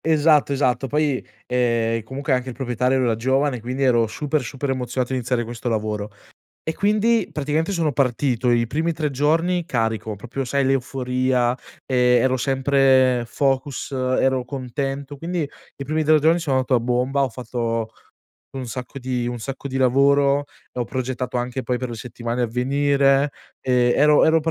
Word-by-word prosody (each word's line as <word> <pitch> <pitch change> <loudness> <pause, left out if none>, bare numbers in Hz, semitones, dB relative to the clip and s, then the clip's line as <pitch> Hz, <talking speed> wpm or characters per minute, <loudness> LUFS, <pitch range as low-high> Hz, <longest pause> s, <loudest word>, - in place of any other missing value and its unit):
Esatto, 155 -2 +4
esatto. 135 -2 +1
Poi, 145 -1 0 0.2
ehm, 115 -2 +1
comunque 135 +5 -3
anche 130 0 -1
il 125 - -7
proprietario 125 0 0
era 115 -2 +2
giovane 130 +2 0
quindi 130 +4 -3
ero 120 -3 +3
super, 150 +6 -2
super 135 +3 -4
emozionato 125 0 -2
a - - +1
iniziare 125 -1 -1
questo 120 +1 -5
lavoro. 105 -2 -2 0.6
E 160 - -2
quindi 215 +2 +2
praticamente 150 +4 -1
sono 165 -6 0
partito 125 -2 +1
i 120 -1 +2
primi 160 +7 -1
3 155 -2 -2
giorni 165 +6 +1
carico, 110 - -2
proprio 120 +6 -5
sai 140 +2 0
l'euforia, 130 -1 0 0.3
ehm, 125 -2 +3
ero 130 0 +2
sempre 130 -1 +3
focus, 135 +1 -1
ero 130 0 +1
contento, 135 +2 -4
quindi 165 0 -3 0.3
i 140 - -6
primi 155 +3 0
3 155 0 +5
giorni 160 +3 +3
sono 145 -5 0
andato 130 0 +1
a 120 - +3
bomba, 125 +4 0
ho 135 - +1
fatto 115 -2 -3 0.6
un 130 -2 -5
sacco 125 +3 -6
di 125 -1 -2
un 120 0 -4
sacco 135 +4 -6
di 135 - -3
lavoro, 140 +2 +3 0.3
ho 125 - -1
progettato 125 0 -3
anche 125 +1 -3
poi 125 +1 -1
per 125 0 -4
le 120 - -5
settimane 120 +1 -4
a - - +3
venire, 140 +3 +2 0.3
ehm, 125 -1 +2
ero 150 +1 +5
ero 160 0 +4
130 Hz, 165 wpm, -22 LUFS, 125-140 Hz, 0.6 s, 3